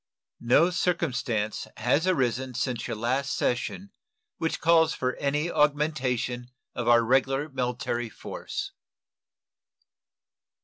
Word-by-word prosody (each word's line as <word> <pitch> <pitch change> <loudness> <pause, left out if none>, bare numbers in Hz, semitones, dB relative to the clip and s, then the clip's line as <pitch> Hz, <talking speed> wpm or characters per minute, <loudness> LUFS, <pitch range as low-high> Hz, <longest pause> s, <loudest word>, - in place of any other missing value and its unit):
No 145 +9 +4
circumstance 125 - -1
has 135 +10 +2
arisen 130 -6 0
since 125 -2 -2
your 120 - -3
last 130 +5 0
session 185 +10 -2 0.5
which 160 - -1
calls 165 -1 +4
for 125 0 -1
any 150 +4 0
augmentation 135 -5 0 0.2
of 120 -1 -3
our 120 -1 +6
regular 135 +4 +2
military 125 -3 -2
force. - - -6
130 Hz, 100 wpm, -27 LUFS, 120-150 Hz, 0.5 s, our